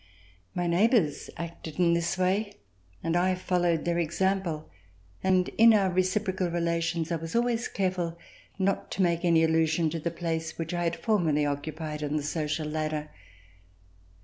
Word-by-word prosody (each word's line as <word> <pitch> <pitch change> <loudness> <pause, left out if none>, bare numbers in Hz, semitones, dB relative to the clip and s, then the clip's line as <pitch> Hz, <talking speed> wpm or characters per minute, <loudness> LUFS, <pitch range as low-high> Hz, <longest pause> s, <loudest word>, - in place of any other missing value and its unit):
My 175 - 0
neighbors 175 - +2
acted 165 -2 -7
in 175 -2 +4
this 170 +2 0
way, 200 +3 0 0.5
and 165 - 0
I 185 +1 +2
followed 175 -3 0
their 170 0 +1
example 170 -1 -1 0.6
and 185 -1 +3
in 230 0 +8
our 195 -3 +3
reciprocal 185 0 0
relations 170 -1 -1
I 170 - +1
was 165 +3 -6
always 235 0 +1
careful 180 -3 -2 0.4
not 195 0 0
to 195 - +1
make 170 -1 +1
any 165 -2 +4
allusion 160 0 +2
to 165 - -3
the 170 - -2
place 165 -1 -3
which 165 +1 -4
I 175 0 -1
had 170 0 0
formerly 170 -10 +1
occu 145 +1 -2
pied 155 -2 -5
on 150 +1 -1
the 150 - -2
social 155 +1 -2
ladder. 155 0 -3
170 Hz, 160 wpm, -28 LUFS, 160-185 Hz, 0.6 s, in